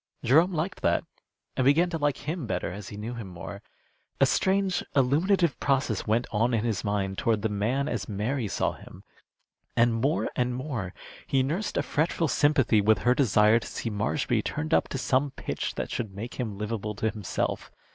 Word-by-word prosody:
Jerome 160 +9 +5
liked 170 +2 -3
that, - - +2 0.5
and 130 - +1
began 160 +7 +4
to 165 - -2
like 145 0 -1
him 160 -5 -2
better - - -2
as 100 +1 -7
he 105 - -8
knew 110 +3 -5
him 115 -4 -6
more. 95 +3 -8 0.6
A - - +6
strange 190 -1 +1
illuminative 165 +6 +3
process 135 -6 0
went 115 +3 +2
on 115 +3 +2
in 110 - 0
his 110 -6 -1
mind 100 -2 -1
toward 115 -5 +1
the 110 - +1
man 115 +7 0
as 110 -4 -3
Mary 110 +4 -1
saw - - 0
him, - - -13 0.7
and 115 0 +4
more 135 +8 +1
and 125 0 0
more 125 -9 -4 0.3
he 135 -1 +2
nursed 170 +10 -2
a - - +2
fretful 160 +2 0
sympathy 135 -8 +3
with 110 +2 +4
her 125 - +5
desire 110 -4 +4
to - - -9
see 115 - -4
Marshby 110 +3 0
tuned 155 +2 -3
up - - +3
to - - -4
some 135 +2 +1
pitch - - -4
that - - -4
should 110 -5 -4
make 115 +6 -7
him 110 -5 -3
livable 105 0 -3
to 110 +2 0
himself. 105 -5 -3
120 Hz, 190 wpm, -27 LUFS, 105-145 Hz, 0.7 s, A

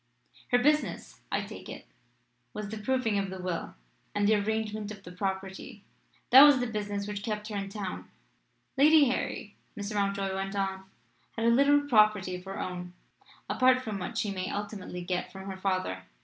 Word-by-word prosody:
"Her 245 - +4
business, 300 +4 0
I - - +1
take - - -9
it, - - -8 0.7
was 210 -1 -5
the 220 0 -5
proving 225 -2 +1
of 195 -1 -2
the 190 0 -7
will 180 -2 -4 0.4
and 205 0 +2
the 215 - +5
arrangement 215 0 -1
of 205 -2 -9
the 180 - -10
property." 190 +3 -5 0.5
"That 260 +2 +11
was 290 -2 +8
the 245 - 0
business 205 -3 -3
which 205 -1 -4
kept 210 0 -4
her 210 - -5
in 195 -1 -3
town." 200 -2 -6 0.7
"Lady 305 +1 +7
Harry," 210 -4 -3 0.2
Mr. 205 +1 -4
Mountjoy 200 -1 0
went 195 +1 -3
on, 190 -1 -2 0.5
"had 225 - 0
a - - +6
little 280 +4 +5
property 215 -8 +3
of 180 +1 -9
her 195 0 -6
own 180 -1 -5 0.5
apart 255 0 +3
from 215 -4 -4
what 190 +5 -5
she 215 -3 0
may 185 -1 -3
ultimately 200 -3 -5
get 180 0 -2
from 190 0 -9
her 190 - -7
father. 185 - -1
205 Hz, 180 wpm, -29 LUFS, 190-220 Hz, 0.7 s, That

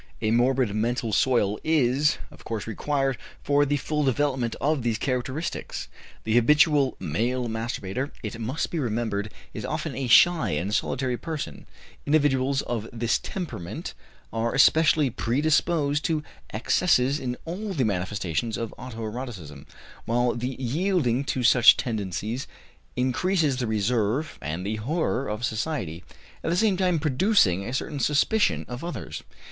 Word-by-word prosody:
A 110 - 0
morbid 125 -1 +2
mental 115 +1 -1
soil 105 -4 +2
is, 150 -2 +2
of - - -15
course, 110 -3 -4
required 135 +3 -1 0.2
for 145 0 +3
the 145 +1 +1
full 150 +2 -1
development 130 -3 0
of 150 -1 +1
these 115 -2 0
characteristics. 130 +5 -3 0.3
The 110 - -1
habitual 145 +3 +4
male 120 +10 -1
masturbator, 115 +2 -3
it 115 +1 -5
must 130 +8 -2
be 170 - -1
remembered, 110 -4 -2 0.2
is - - -6
often - - -3
a 135 -2 -2
shy 150 - +5
and 100 +6 -3
solitary 125 +2 0
person; 150 - -6 0.4
individuals 140 -2 +2
of 115 -2 -4
this 115 -1 0
temperament 160 - -6 0.4
are 115 +2 -1
especially 150 -1 +5
predisposed 145 +4 +1
to 155 -2 0 0.3
excesses 135 +3 +2
in 125 -3 -3
all 195 +5 -4
the 135 -8 +1
manifestations 95 +1 -2
of 115 -2 -4
auto 120 -3 -7
erotism, 105 - -7 0.4
while 120 +1 +1
the 125 +2 -3
yielding 140 -1 +1
to 130 -2 -1
such 120 0 +7
tendencies 110 +2 -3 0.5
increases 140 +3 +1
the 125 -2 -1
reserve 110 +6 0
and 80 +5 -4
the 110 +2 -2
horror 135 +2 -1
of 105 +3 -2
society, 110 - -3 0.4
at - - -1
the 170 - +1
same 210 -1 +3
time 180 -2 +2
producing 145 - +3
a 115 - -5
certain 140 +3 -3
suspicion 150 +10 +2
of 125 +3 -7
others. 175 0 -5
125 Hz, 140 wpm, -26 LUFS, 110-145 Hz, 0.5 s, such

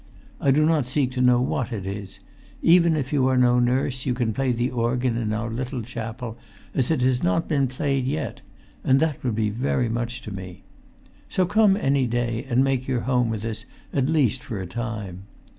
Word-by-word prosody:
I 140 - +1
do 150 +3 +4
not 155 -5 +2
seek 130 -1 0
to 125 0 -2
know 125 -1 +5
what 130 0 -1
it 100 -5 -4
is. 100 0 -6 0.5
Even 170 -1 +5
if 140 -2 -2
you 135 -3 +3
are 130 -1 +2
no 125 -1 +4
nurse 130 +1 +1
you 125 - 0
can 120 -3 0
play 135 +3 0
the 120 +2 0
organ 120 0 0
in 115 -2 -1
our 115 +2 -2
little 125 +1 -3
chapel 115 +1 -6 0.3
as 130 -3 +1
it 160 -5 +1
has 125 -1 +2
not 90 - +1
been 140 -4 +2
played 135 0 -1
yet; 140 -4 -3 0.4
and 135 +1 +4
that 155 -2 -1
would 120 -4 0
be 105 -1 0
very 125 +1 0
much 120 +2 -3
to 110 - -7
me. 95 -2 -8 0.7
So 185 - +2
come 205 +1 +4
any 135 -7 +2
day 120 -1 -2
and 125 +2 +3
make 135 -2 0
your 125 -3 0
home 125 -2 +1
with 110 -1 -3
us 115 -1 -4 0.3
at 135 0 +1
least 135 -6 +2
for 120 -4 -6
a 95 - -4
time." 105 -3 -5
125 Hz, 210 wpm, -24 LUFS, 115-135 Hz, 0.7 s, know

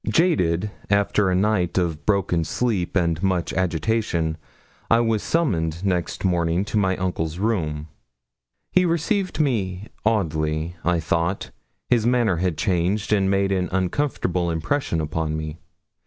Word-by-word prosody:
Jaded 105 - +2 0.2
after 100 0 +2
a 90 - +2
night 95 -3 +1
of 85 -4 -1
broken 95 -5 +2
sleep 100 -1 -1
and 85 -3 +1
much 95 -3 0
agitation, 85 -2 0 0.5
I 115 - +5
was 115 -3 +1
summoned 85 - 0
next 90 0 -1
morning 85 +1 +1
to 105 - -2
my 95 -2 +1
uncle's 85 -3 -2
room. 80 -8 -1 0.8
He 185 - +4
received 180 +3 0
me 105 -9 -1
oddly, 80 -6 0
I 90 0 +2
thought. 85 +4 -1 0.4
His 120 -2 +2
manner 120 -7 +2
had 90 -2 -1
changed, 95 +5 0
and 95 -2 +2
made 100 0 +2
an 90 -2 0
uncomfortable 90 -2 0
impression 85 - -1
upon 80 0 -2
me. 80 0 -5
95 Hz, 135 wpm, -23 LUFS, 85-105 Hz, 0.8 s, I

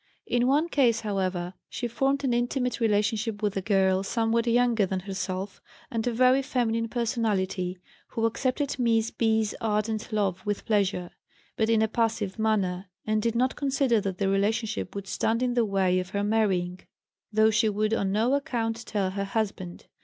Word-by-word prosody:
In 245 0 +1
one 295 +5 +3
case, 245 -8 +2
however, 185 -4 -2 0.2
she 240 - -3
formed 270 +4 0
an 260 -3 +1
intimate 245 +1 0
relationship 215 0 0
with 205 -1 0
a 195 - -1
girl 190 -2 +2
somewhat 230 +3 0
younger 235 -2 +3
than 185 0 -2
herself, 190 0 -4 0.3
and 225 0 -1
a - - +2
very 255 +3 +4
feminine 230 -4 -1
personality, 205 -6 -1 0.3
who 225 - -2
accepted 260 +4 -1
Miss 230 -2 +2
B.'s 220 -2 +1
ardent 215 +1 -1
love 195 -4 0
with 205 -1 -3
pleasure, 195 -5 0 0.4
but 220 0 +1
in 225 -1 +4
a - - +2
passive 225 -3 -1
manner, 195 -4 0 0.2
and 215 0 +1
did 230 +1 0
not 255 +2 +1
consider 270 -5 +1
that 195 -2 -3
the 195 - 0
relationship 210 +4 0
would 200 -1 -5
stand 225 +5 0
in 250 -1 +1
the 240 -2 +2
way 190 -3 +2
of 180 0 -5
her 200 +1 -1
marrying, 190 -4 +1 0.5
though 220 +1 +4
she 215 0 +3
would 215 +1 0
on 195 -3 0
no 225 +6 +2
account 230 -5 -1
tell 195 -3 -1
her 200 +1 -2
husband. 195 -4 -3
220 Hz, 175 wpm, -27 LUFS, 195-235 Hz, 0.5 s, very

